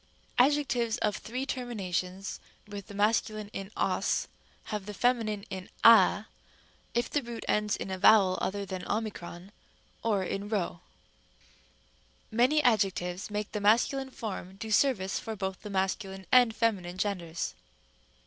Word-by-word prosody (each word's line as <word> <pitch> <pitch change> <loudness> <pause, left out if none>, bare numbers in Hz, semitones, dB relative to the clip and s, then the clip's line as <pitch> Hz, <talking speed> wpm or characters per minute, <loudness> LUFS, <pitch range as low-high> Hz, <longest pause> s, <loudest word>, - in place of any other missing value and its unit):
tem. 250 - +7
b. 295 - +2
Adjectives 245 -6 0
of 210 -2 0
three 255 +4 -4
terminations 195 -7 -3 0.3
with 205 -2 -8
the 200 - -10
masculine 215 0 +1
in 195 0 -5
os - - +1 0.4
have 210 -2 -5
the 210 - -6
feminine 225 -3 +1
in 185 -1 -6
a, 225 -2 +7 0.7
if 240 - +1
the 290 - 0
root 235 -2 -7
ends 210 0 +1
in 190 - -5
a 190 - -3
vowel 195 -2 +6
other 200 +1 -2
than 185 -2 -5
o - - +1 1.1
or 210 -4 +1
in 195 +2 -4
p. 220 - 0
Rem. 185 -4 -1
c. 175 - -18 1.6
Many 270 +6 +4
adjectives 195 -5 +1
make 210 0 -3
the 210 - -3
masculine 245 +6 +3
form 200 -6 -6
do 220 +2 -6
service 210 -5 +2
for 225 -1 -5
both 190 -2 -4
the 210 - -7
masculine 190 0 -2
and 245 -3 +6
feminine 190 -6 0
genders. 180 -4 -2
210 Hz, 150 wpm, -29 LUFS, 190-230 Hz, 1.6 s, tem